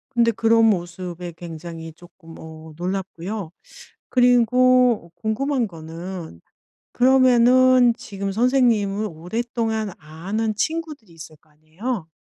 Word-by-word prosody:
근데 230 -1 +4
그런 225 +1 +3
모습에 175 -3 -2
굉장히 165 -1 -8
쪼끔 165 0 -16
어 160 0 -11
놀랍고요. 185 0 -5 0.6
그리고 250 -4 +3
궁금한 235 +5 -1
거는 165 - -9 0.5
그러면은 255 -1 +5
지금 195 -1 -5
선생님을 220 -3 +1
오랫동안 220 +5 -3
아는 195 +8 -4
친구들이 305 - -4
있을 160 -1 -12
거 155 - -33
아니에요? 165 +6 -6
205 Hz, 255 characters per minute, -22 LUFS, 170-240 Hz, 0.6 s, 그러면은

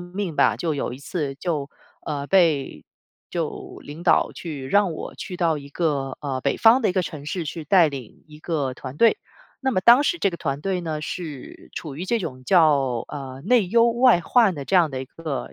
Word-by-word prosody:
命 175 -1 -5
吧。 - - +3
就 160 -3 -2
有 140 - -3
一 125 - -8
次 140 -1 -4
就 150 -3 -3 0.4
呃， 145 -2 -3
被 165 -6 +2 0.5
就 - - -5
领 150 +4 -9
导 175 - +3
去 145 -6 -7
让 200 +3 +2
我 - - -7
去 180 - -7
到 165 -3 +1
一 140 0 -11
个， 140 -4 -2
呃， 135 -3 -3
北 - - 0
方 235 +3 +5
的 - - +3
一 185 - 0
个 185 - +1
城 150 -4 -7
市 175 +2 -3
去 160 +1 -6
带 170 +1 +5
领 135 -6 -9
一 150 - -13
个 145 -7 -2
团 130 +1 -9
队。 230 +6 +4 0.4
那 265 -1 0
么 185 - +1
当 235 +8 +7
时 345 +4 0
这 200 - +1
个 170 - -6
团 140 +1 -3
队 190 +1 -1
呢， 160 -3 -4
是 155 -5 -7
处 150 -4 -6
于 175 - -4
这 235 +2 +1
种 130 -9 -6
叫， 140 -8 +3
呃， 135 -2 -7
内 230 -1 +3
忧 235 +2 +4
外 240 -6 +4
患 215 +1 +3
的 140 - -6
这 195 - -2
样 165 -4 +4
的 130 - -4
一 - - -6
个 155 0 -6
160 Hz, 230 characters per minute, -23 LUFS, 140-185 Hz, 0.5 s, 当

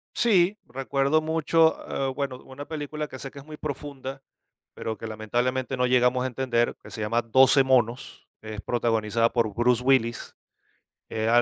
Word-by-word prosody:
Sí, 205 -3 +3
recuerdo 135 +3 +1
mucho, 160 +1 +3 0.3
eh, - - -2
bueno, 135 -2 -3
una 140 +2 -9
película 150 0 -4
que 130 -2 -10
sé 135 - -6
que 140 - -12
es 135 - -13
muy 155 -1 -10
profunda, 135 -2 -6 0.5
pero 110 -1 -4
que 115 - -7
lamentablemente 120 +4 -2
no 125 - +2
llegamos 125 0 +3
a - - 0
entender, 120 -2 0
que - - -12
se 110 - -7
llama 115 +3 0
12 130 +4 +5
monos, 125 -2 0
es 110 -1 -7
protagonizada 115 -1 +1
por 115 -4 +1
Bruce 120 +2 +2
Willis, 120 -3 +1 0.8
eh, 110 0 -1
130 Hz, 165 wpm, -26 LUFS, 115-140 Hz, 0.8 s, 12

